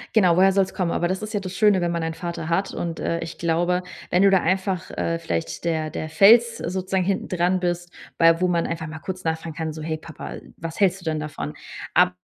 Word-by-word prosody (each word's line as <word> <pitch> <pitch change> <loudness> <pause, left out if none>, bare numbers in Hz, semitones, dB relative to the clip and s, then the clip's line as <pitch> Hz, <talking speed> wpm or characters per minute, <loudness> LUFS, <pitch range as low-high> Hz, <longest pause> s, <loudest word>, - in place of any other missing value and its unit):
Genau, 180 -6 +5
woher 190 +1 +5
soll's 195 -1 +1
kommen? 185 -3 -1
Aber 175 - 0
das 190 +2 -2
ist 215 0 -6
ja 205 - 0
das 185 -1 -6
Schöne, 210 -4 +4
wenn 175 0 0
man 170 -1 -1
einen 165 0 -2
Vater 170 -1 -5
hat. 190 +4 0
Und, 165 -1 -4
äh, 170 - -1
ich 165 0 -6
glaube, 175 +2 +1 0.3
wenn 180 - +4
du 200 - +7
da 190 -1 +5
einfach, 185 +1 -1
äh, 165 0 -2
vielleicht 165 0 -3
der 160 -2 0
der 155 - -4
Fels 225 +7 +6
sozusagen 185 +1 -1
hinten 195 +1 -1
dran 180 +1 +1
bist, 175 -1 -2 0.3
bei 165 0 +5
wo 180 - +2
man 170 -2 +1
einfach 165 -1 -4
mal 160 +1 -7
kurz 185 +2 -6
nachfragen 160 0 -2
kann, 160 -1 -3
so: 155 - -8
„Hey 160 0 -2
Papa, 155 0 -8 0.2
was 165 0 -7
hältst 195 -1 +2
du - - -14
denn 155 -1 -1
davon?“ 75 - -5 0.4
Aber - - +5
175 Hz, 240 wpm, -23 LUFS, 165-190 Hz, 0.4 s, du